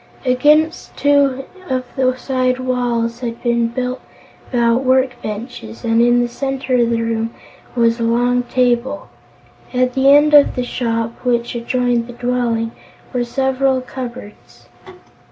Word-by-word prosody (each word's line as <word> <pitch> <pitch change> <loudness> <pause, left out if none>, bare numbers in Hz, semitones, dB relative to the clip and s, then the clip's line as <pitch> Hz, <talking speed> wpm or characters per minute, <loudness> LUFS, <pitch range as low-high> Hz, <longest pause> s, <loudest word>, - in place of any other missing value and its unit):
Against 300 +6 +2
two 280 -2 +2 0.3
of 255 -1 -1
the 255 -1 +1
side 255 -1 0
walls 240 -2 -1
had 235 -2 -5
been 235 -1 +2
built 250 +2 -3 0.5
stout 235 0 +2
work 260 -1 +2
benches 210 - -7
and 225 0 +3
in 240 0 +4
the 240 - 0
center 270 +1 -3
of 240 -2 +3
the 230 -1 0
room 230 0 -2 0.4
was 230 -1 +2
a - - -1
long 245 +2 +2
table. 250 +2 0 0.6
At 250 0 +1
the 265 +1 +3
end 295 +1 +6
of 290 -1 +6
the 250 - -1
shop, 230 -2 -3
which 240 -1 0
adjoined 240 0 0
the 245 - -9
dwelling, 240 -2 -1 0.4
were 245 -1 0
several 265 +1 0
cupboards. 250 -4 -9
245 Hz, 140 wpm, -18 LUFS, 235-260 Hz, 0.6 s, end